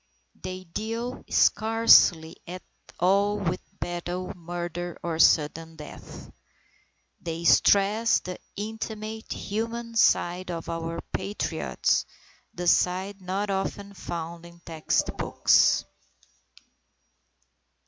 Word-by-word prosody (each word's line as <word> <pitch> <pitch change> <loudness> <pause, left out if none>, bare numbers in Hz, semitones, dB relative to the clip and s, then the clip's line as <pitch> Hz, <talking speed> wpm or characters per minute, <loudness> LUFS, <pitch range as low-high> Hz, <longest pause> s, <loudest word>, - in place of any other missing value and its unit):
They 185 0 -6
deal 225 +7 -5
scarcely 215 -7 +5
at 180 +1 -7 0.4
all 200 +3 +3
with 180 -3 -2 0.2
battle, 175 +1 -4
murder, 175 0 -5
or 165 -2 -3
sudden 165 +1 +3
death. 150 -2 -11 0.9
They 165 0 -5
stress 205 +6 +4
the 180 0 -7 0.2
intimate, 220 +1 -6
human 230 +2 -4
side 180 -4 +2
of 170 -1 -5
our 165 0 -4
Patriots, 205 +1 -1 0.4
the 175 - -6
side 190 +3 +1
not 195 +3 -2
often 195 +1 -3
found 170 -2 -6
in 170 0 -16
textbooks. 160 -2 +2
185 Hz, 90 wpm, -26 LUFS, 170-205 Hz, 0.9 s, scarcely